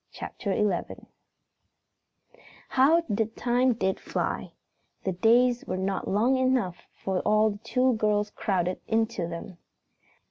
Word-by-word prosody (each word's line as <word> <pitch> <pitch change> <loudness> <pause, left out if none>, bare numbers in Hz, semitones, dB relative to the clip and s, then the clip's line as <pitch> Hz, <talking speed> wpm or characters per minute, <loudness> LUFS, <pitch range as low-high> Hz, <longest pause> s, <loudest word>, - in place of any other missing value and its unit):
CHAPTER 200 - -5
XI 205 -4 -1 1.6
How 295 +6 +4
the 220 0 0
time 245 +2 +1
did 190 -4 -1
fly! - - -3 0.5
The 190 - 0
days 235 +6 +3
were 185 - -3
not 190 +1 -2
long 235 +7 +2
enough 255 -9 0
for 190 -1 -2
all 215 +2 +3
the 205 - -8
two 250 +3 +1
girls 210 -1 +1
crowded 180 -3 -1
into 225 -5 0
them. 170 +1 -8
215 Hz, 120 wpm, -27 LUFS, 190-245 Hz, 1.6 s, How